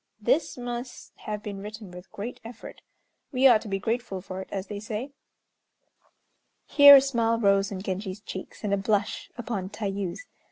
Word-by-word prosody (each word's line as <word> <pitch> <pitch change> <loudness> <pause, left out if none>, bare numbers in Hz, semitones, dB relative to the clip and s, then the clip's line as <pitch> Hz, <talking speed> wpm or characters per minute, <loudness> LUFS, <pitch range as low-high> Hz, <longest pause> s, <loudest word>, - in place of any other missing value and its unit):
This 280 +9 +1
must 245 0 -6
have 210 -1 -4
been 200 -2 -6
written 210 -1 -8
with 180 +1 -12
great 220 +5 -6
effort. 230 +1 -10 0.5
We 260 -1 +2
ought 235 -5 +7
to - - -9
be 195 -1 -1
grateful 225 -1 -2
for 185 0 -7
it, - - -10
as 195 -1 -3
they 205 -1 -6
say." 220 +6 -5 1.5
Here 285 -1 +9
a 275 - +8
smile 230 -4 +1
rose 200 -2 +3
on 190 -1 -5
Genji's 190 0 -4
cheeks, 190 +1 -8
and 205 -1 0
a - - +3
blush 200 +1 -1
upon 215 -6 -4
Tayû's. 200 - -4
210 Hz, 170 wpm, -27 LUFS, 195-240 Hz, 1.5 s, Here